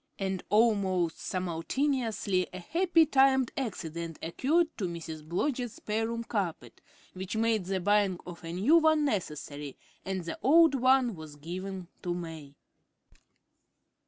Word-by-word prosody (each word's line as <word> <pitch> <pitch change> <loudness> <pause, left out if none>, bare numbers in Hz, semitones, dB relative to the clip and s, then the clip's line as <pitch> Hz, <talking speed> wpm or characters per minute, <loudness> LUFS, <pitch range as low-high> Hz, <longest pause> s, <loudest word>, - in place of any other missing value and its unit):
And 190 -1 -2
almost 195 -6 +2
simultaneously 200 - -1
a 185 - -7
happily 335 - +3
timed 265 -3 +4
accident 170 - -4
occurred 315 - +1
to 190 - 0
Mrs. 165 -2 -7
Blodgett's 240 - -2
spare 220 +1 -2
room 230 0 -3
carpet, 200 -8 -4 0.3
which 190 +3 -5
made 220 -3 +1
the 190 +1 -1
buying 200 0 +2
of 175 -1 -9
a 165 - -5
new 210 - +4
one 315 -2 +3
necessary, 150 - -3 0.3
and 190 -2 -3
the 170 - -5
old 320 +6 +6
one 260 -2 +3
was 155 -2 -10
given 180 +4 -6
to 175 -1 -2
May. 160 -5 -8
195 Hz, 130 wpm, -29 LUFS, 170-255 Hz, 0.3 s, old